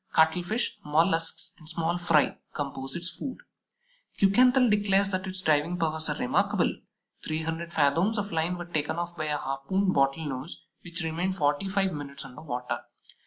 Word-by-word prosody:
Cuttlefish, 175 +8 +2
Mollusks, 165 +2 +1
and 155 -1 -10
small 170 +1 -1
fry 165 -4 +3
compose 135 -2 -4
its 170 +1 0
food. 250 +9 -5 0.8
Kuekenthal 250 +6 +5
declares 200 -2 +3
that 185 0 -1
its 185 0 -4
diving 160 +1 +2
powers 160 -1 -1
are - - 0
remarkable; - - +1 0.5
300 165 +2 -3
fathoms 165 +9 +2
of 205 0 -2
line 165 +2 0
were 175 - -6
taken 155 -3 -1
off 170 0 -4
by 155 - -3
a 150 -1 0
harpooned 145 +9 0
Bottle 135 +3 +2
nose 135 +3 -6 0.2
which 175 0 -3
remained 170 +4 -1
forty 145 +5 +1
five 195 -1 +1
minutes 140 -2 -6
under 125 - -11
water. 125 -5 -3
165 Hz, 160 wpm, -28 LUFS, 150-185 Hz, 0.8 s, Kuekenthal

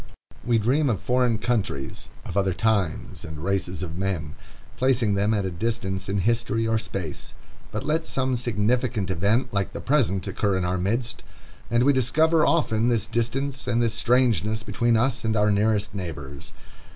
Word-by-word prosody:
We 120 -1 +2
dream 130 +7 +2
of 110 - 0
foreign 125 -2 +1
countries, 105 - -2 0.2
of 85 - -6
other 95 -2 +1
times 100 -2 -1
and 80 -1 -7
races 90 +1 -2
of 85 0 -5
men, 90 -7 -2 0.4
placing 125 -5 +2
them 100 +2 +1
at 105 -3 +1
a 95 - -2
distance 95 0 -2
in 100 0 0
history 115 +1 +1
or 110 0 +2
space; 95 -7 -5 0.4
but 105 - -3
let 160 +2 0
some 130 -1 0
significant 115 -2 0
event 105 +8 +1
like 100 -1 -1
the - - -5
present 120 -10 +1
occur 100 -3 0
in 90 - -1
our 90 +1 0
midst, 115 +6 -1 0.5
and 120 +1 +3
we 140 +2 +5
discover, 155 +5 +3
often, 120 -8 +2
this 115 -3 +1
distance 125 +4 -2
and 120 -1 +1
this 115 -2 +2
strangeness 110 -4 +2
between 115 +3 +1
us 120 +2 +1
and 110 -1 0
our 105 0 +3
nearest 105 0 +1
neighbors. 70 -8 -6
110 Hz, 170 wpm, -25 LUFS, 95-120 Hz, 0.5 s, we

